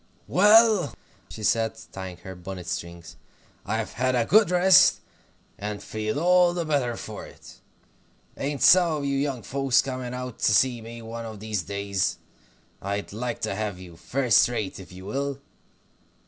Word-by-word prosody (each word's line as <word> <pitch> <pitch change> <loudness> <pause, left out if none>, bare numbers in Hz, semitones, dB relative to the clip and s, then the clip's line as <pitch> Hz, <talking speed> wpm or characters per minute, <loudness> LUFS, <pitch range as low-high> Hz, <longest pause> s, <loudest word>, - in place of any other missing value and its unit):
"Well," 210 -3 +5 0.3
she 110 - -9
said, 110 +1 +1
tying 95 -2 -7
her 95 - -7
bonnet 90 0 -8
strings, 85 -1 -6 0.5
"I've 110 +1 -2
had 130 +1 0
a 120 -2 +2
good 210 - +5
rest, 180 +1 +5 0.6
and 105 0 -5
feel 110 +4 -3
all 180 +1 +4
the 170 -2 -2
better 135 -6 0
for - - -8
it. - - -15 0.8
Ain't 140 0 -3
some 175 -3 +6
of 145 -2 -3
you 140 0 0
young 135 -4 -2
folks 135 +4 +1
coming 130 -2 -5
out 125 -2 -6
to 105 - +2
see 125 -3 +2
me 115 +1 -10
one 115 +1 -7
of 110 -2 -8
these 105 -2 -3
days? 100 +1 -2 0.6
I'd 100 +1 -4
like 120 +2 -4
to - - -2
have 105 -2 -3
you, 90 -2 -12
first 125 +8 +2
rate, 105 -6 -4
if 95 - -12
you 95 +1 -11
will. 140 +5 -3
115 Hz, 160 wpm, -25 LUFS, 100-140 Hz, 0.8 s, some